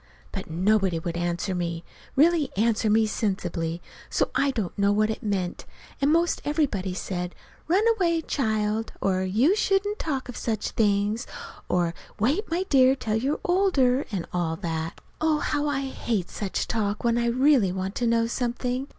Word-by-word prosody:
But - - -6
nobody 190 +1 +2
would 165 +1 -4
answer 175 +2 -1
me 170 -2 -3 0.3
really 310 -1 +4
answer 220 0 +2
me 220 +1 +4
sensibly, 175 -6 -2 0.3
so - - 0
I'd 275 -4 +1 0.2
know 200 0 +2
what 215 +1 +2
it 220 - -5
meant; 190 -4 -2 0.4
and 280 +2 +4
'most 335 +2 +2
everybody 240 - 0
said, 180 -1 -4 0.3
"Run 370 +6 +3
away, 335 -5 +1
child," 220 -5 -1
or 185 -1 +1
"You 225 - +3
shouldn't 410 0 +1
talk 275 -5 -2
of 250 - -7
such 220 -3 -2
things," 210 +2 +1 0.4
or, 175 -2 +1 0.3
"Wait, 290 - +1
my 340 +3 0
dear, 265 -6 +5
till 220 -5 -2
you're 270 +6 -1
older"; 295 -9 +2
and 185 -5 -2
all 170 -2 0
that. 165 -2 -4 0.2
Oh, 315 -1 +3
how 295 0 -1
I 280 -2 0
hate 235 -8 -2
such 200 -3 -3
talk 210 -2 -1
when 235 0 +2
I 235 - +1
really 250 -4 +4
want 190 +1 -3
to 240 - +1
know 230 0 +3
something! 245 +2 -2
225 Hz, 165 wpm, -26 LUFS, 190-275 Hz, 0.4 s, dear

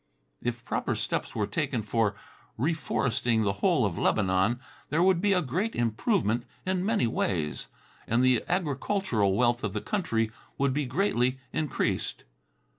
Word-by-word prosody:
If 120 -1 -3
proper - - -1
steps - - -2
were - - +1
taken 110 - -1
for 105 -1 +1 0.4
reforesting 125 -5 +1
the 100 -1 +1
whole - - +3
of - - -2
Lebanon, 95 +5 +2 0.3
there 160 +5 +2
would 185 -2 +4
be 205 0 +3
a 180 -2 +3
great 185 - -1
improvement 120 - +1 0.2
in 185 -1 0
many 210 - +2
ways, 85 -9 -1 0.4
and 115 +3 +2
the 130 -3 +4
agricultural 145 - +1
wealth 120 0 +2
of 105 -3 -2
the 105 - -1
country 115 - 0 0.3
would 140 -1 +2
be 145 -1 -1
greatly 130 -5 +1 0.2
increased. 155 -3 -1
125 Hz, 145 wpm, -28 LUFS, 110-175 Hz, 0.4 s, would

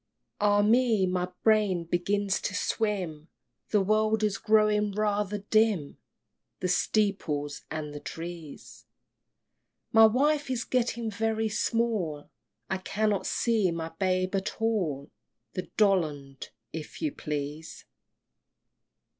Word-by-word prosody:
IV. - - -54
Ah 205 0 +4
me! 225 -2 +4
my 180 0 -1
brain 210 -5 +3
begins 195 +4 0
to 200 - -3
swim! 190 -8 -2 0.4
The 210 - +3
world 215 +2 +2
is 210 -2 0
growing 210 -1 +3
rather 210 -1 0
dim; 215 -9 +2 0.6
The 185 - -1
steeples 175 -8 0
and 150 -2 -5
the 145 - -6
trees 165 -1 -9 1.0
My 225 0 +8
wife 285 +5 +1
is 245 -3 -1
getting 235 -2 -1
very 220 +1 0
small! 210 -10 -1 0.4
I 190 - -2
cannot 205 +1 0
see 225 -5 +1
my 165 -1 -3
babe 185 +2 -1
at 195 +1 -2
all! 180 -12 -1 0.4
The 185 - -5
Dollond, 155 -10 +1 0.2
if 160 -1 -7
you 305 - +1
please! 150 - -5
200 Hz, 115 wpm, -28 LUFS, 170-220 Hz, 1.0 s, My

